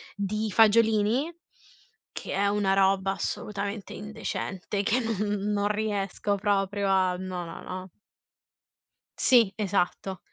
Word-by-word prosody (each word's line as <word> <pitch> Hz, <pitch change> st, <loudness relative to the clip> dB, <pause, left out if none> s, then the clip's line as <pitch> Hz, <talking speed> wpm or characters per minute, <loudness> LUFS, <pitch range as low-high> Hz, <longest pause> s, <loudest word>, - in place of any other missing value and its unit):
di 210 Hz, +1 st, -2 dB
fagiolini, 225 Hz, -, +4 dB, 0.8 s
che -, -, -6 dB
è 200 Hz, +1 st, +2 dB
una 200 Hz, -1 st, +2 dB
roba 195 Hz, 0 st, +3 dB
assolutamente 200 Hz, +2 st, -4 dB
indecente 205 Hz, -2 st, -4 dB
che 230 Hz, +5 st, +2 dB
non 225 Hz, -4 st, -2 dB, 0.4 s
non 205 Hz, 0 st, +1 dB
riesco 205 Hz, -1 st, -1 dB
proprio 200 Hz, 0 st, 0 dB
a 185 Hz, -1 st, +3 dB
no, 185 Hz, -2 st, -5 dB
no, 165 Hz, -, -8 dB
no. 185 Hz, 0 st, -6 dB, 1.3 s
Sì, 230 Hz, -6 st, +5 dB
esatto. 190 Hz, -2 st, -1 dB
200 Hz, 110 wpm, -27 LUFS, 190-215 Hz, 1.3 s, Sì